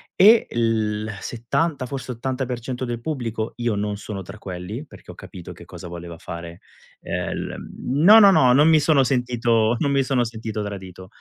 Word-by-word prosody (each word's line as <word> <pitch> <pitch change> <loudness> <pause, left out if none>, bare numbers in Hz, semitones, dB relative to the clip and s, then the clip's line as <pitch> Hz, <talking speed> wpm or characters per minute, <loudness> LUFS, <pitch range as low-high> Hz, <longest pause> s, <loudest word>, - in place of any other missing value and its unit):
e 215 +4 +7
il 110 -2 0
70 130 +4 -2
forse 135 -1 -5
80% 125 0 -4
del 120 -1 -4
pubblico 120 -6 -4
io 120 -2 -1
non 105 0 -2
sono 100 -1 -6
tra 100 +4 -10
quelli, 95 - -7
perché - - -16
ho - - -13
capito 90 -2 -10
che - - -14
cosa - - -10
voleva 85 -1 -9
fare, 85 +1 -8 0.4
ehm, - - -3
l - - -5 0.3
no, 170 - +7
no, 200 -2 +8
no, 130 -8 +5
non 150 +4 +5
mi 160 -1 +6
sono 145 -3 +3
sentito 120 -3 +1
non 140 - +1
mi 135 -1 +2
sono 130 -2 +1
sentito 110 -2 -5
tradito, 95 -2 -8
120 Hz, 175 wpm, -22 LUFS, 105-135 Hz, 0.4 s, no